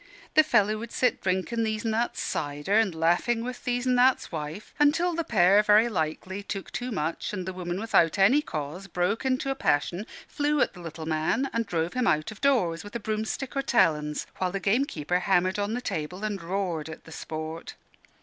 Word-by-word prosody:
The 310 - +8
fellow 215 -7 +2
would 230 +1 -7
sit 250 -1 +1
drinking 190 +5 0
These 215 0 -2
an' 225 - +1
That's 230 +2 -1
cider 145 +5 -2
and 215 -5 +3
laughing 175 +9 +1
with 250 +1 -6
These 245 0 0
an' 255 - +3
That's 250 +1 +3
wife, 155 +4 -6
until 330 +5 +3
the 335 0 -1
pair, 200 - +5
very 210 +3 +5
likely, 185 +1 -3
took 195 -1 -6
too 250 +1 -4
much, 165 0 -2
and 185 -3 -3
the 190 - -3
woman 180 0 -4
without 200 -6 +3
any 220 +10 +5
cause 155 - -5
broke 180 +6 -1
into 260 +1 0
a - - -1
passion, 175 - 0 0.2
flew 295 0 0
at - - +2
the 180 - -11
little 165 -1 -7
man, 160 - 0
and 230 -1 -1
drove 165 -2 -1
him 250 -1 0
out 155 +4 +1
of 215 - -12
doors, 200 -13 +2
with 205 - -10
broomstick 220 +5 -3
or 275 - +1
talons, 150 - +1
while 185 -1 -1
the 195 - -2
gamekeeper 190 - 0
hammered 185 +1 +2
on 205 +2 -1
the 245 - -3
table 180 -1 -4
and 205 -3 -2
roared 170 -3 -2
at 160 - -9
the 165 - -14
sport. 160 +1 -6
200 Hz, 200 wpm, -27 LUFS, 165-235 Hz, 0.2 s, The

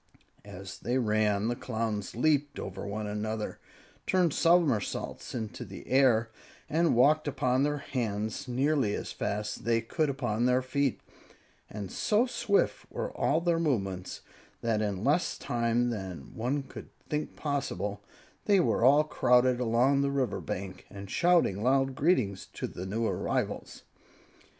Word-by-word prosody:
As 95 -1 -9
they 120 +3 -1
ran, 105 -3 +1
the 120 - 0
Clowns 110 -5 -3
leaped 145 +2 +1
over 95 +1 -6
one 105 +1 -3
another, 105 +1 -3 0.5
turned 180 -5 +3
somersaults 165 - +1
into 110 -3 -4
the - - -10
air, 120 -4 +3 0.4
and 165 -1 +2
walked 150 +5 +4
upon 130 -2 +1
their 145 +1 +1
hands 115 -2 -3
nearly 130 -3 +1
as - - -5
fast 105 +1 -3
as - - -16
they 115 0 +2
could 150 +7 -1
upon 120 -4 0
their 125 +1 +3
feet; 135 0 0 0.7
and 100 -3 -6
so 215 +3 +2
swift 235 -5 0
were - - -4
all 155 +3 +1
their 170 -1 +1
movements 95 - -2 0.4
that, 115 -2 +1
in 100 -2 -2
less 150 +7 +1
time 120 0 0
than 95 - -6
one 130 +5 -1
could - - -10 0.2
think 150 0 -3
possible, 105 - -3 0.4
they 200 -2 +5
were 115 - +2
all 145 +4 +6
crowded 125 -4 +3
along 125 +4 +3
the 140 - +1
river 130 -7 -1
bank, 95 -3 -6
and 100 -1 -9
shouting 170 - +3
loud 135 +2 +2
greetings 130 - +1
to - - -4
the 90 +1 -6
new 110 +4 -1
arrivals. - - -2
120 Hz, 145 wpm, -29 LUFS, 105-140 Hz, 0.7 s, all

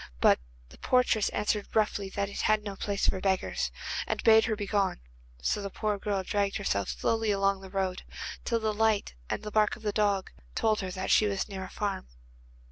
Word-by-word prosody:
But - - +5 0.3
the - - -16
portress 250 -4 +3
answered 210 0 -1
roughly 210 -2 +1
that 200 +1 -2
it 200 - -4
was 215 -1 +3
no 200 -2 -5
place 200 0 -1
for 190 - +1
beggars, 190 -1 0 0.4
and - - -2
bade 220 0 +7
her 225 -3 0
begone, 205 - 0 0.4
so 205 - +1
the 200 - -4
poor 210 +1 -2
girl 200 -2 -1
dragged 200 +1 0
herself 100 - -1
slowly 225 -1 0
along 195 -1 +2
the 190 - -10
road, 190 -1 -1 0.4
till 230 -2 0
a 215 - +2
light 215 - +1 0.2
and - - -2
the 210 - -5
bark 215 0 +3
of 225 -2 -14
a 210 - +2
dog 200 -2 +1 0.2
told 220 -1 +2
her 190 - -3
that 185 +1 -3
she 215 - +5
was 195 -1 -1
near 195 -2 -5
a - - -10
farm. 200 - -3
205 Hz, 205 wpm, -29 LUFS, 195-215 Hz, 0.4 s, bade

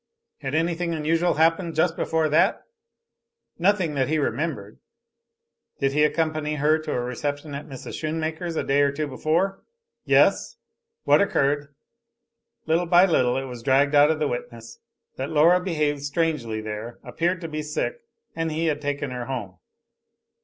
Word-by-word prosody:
Had 135 0 -4
anything 170 +1 0
unusual 165 +3 +1
happened 165 +2 +2
just 160 +1 +2
before 160 -1 0
that? 155 +1 +2 1.0
Nothing 185 -3 +2
that 135 -2 0
he 155 - +1
remembered. 135 -7 -3 1.0
Did 135 -1 +1
he 150 +1 +3
accompany 155 -1 0
her 150 +2 +2
to 155 -1 -5
a - - -1
reception 145 +4 -4
at 140 +2 -6
Mrs. 135 -3 -8
Shoonmaker's 160 +2 -3
a - - -1
day 140 +1 +2
or 140 -1 +3
two 150 +2 -3
before? 165 +8 -1 0.4
Yes. - - +3 0.5
What - - +4
occurred? 145 -5 0 0.9
Little 165 +2 +1
by 175 +2 +6
little 130 -8 +2
it 135 - -3
was 125 -2 -8
dragged 140 +3 +3
out 145 +1 +6
of 160 - +1
the 155 -1 0
witness 115 -2 -7 0.4
that 135 +1 -3
Laura 160 +4 +5
had 180 - -6
behaved 150 -5 0
strangely 140 -7 -1
there, 110 +2 -6
appeared 175 +2 -1
to 165 - -4
be 155 -1 -4
sick, 155 - -3 0.4
and 165 -1 -2
he 160 +2 -1
had 150 -2 0
taken 145 -1 -3
her 125 -1 -5
home. 105 -9 -6
150 Hz, 160 wpm, -24 LUFS, 140-165 Hz, 1.0 s, by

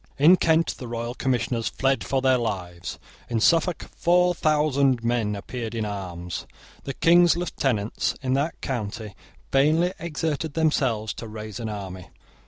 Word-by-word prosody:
In 155 +6 +7
Kent 165 -2 +2
the 125 - -6
royal 115 +1 -4
commissioners 120 -3 -1
fled 135 0 0
for 135 -1 -1
their 130 -1 +4
lives. 90 -6 -4 0.3
In 115 -2 0
Suffolk 165 +7 +2
four 180 +1 +3
thousand 140 -6 +2
men 115 -3 0
appeared 115 +3 -5
in 110 -2 -1
arms. 90 -4 -5 0.4
The 135 - -4
King's 175 0 +5
lieutenants 130 -11 -1
in 130 -2 -1
that 140 +4 -1
county 110 -4 -4 0.4
vainly 160 +6 +3
exerted 160 -2 -3
themselves 130 -9 +1
to 115 - -8
raise 110 -1 -7
an 115 -2 -4
army. 95 -3 -7
125 Hz, 145 wpm, -25 LUFS, 110-155 Hz, 0.4 s, In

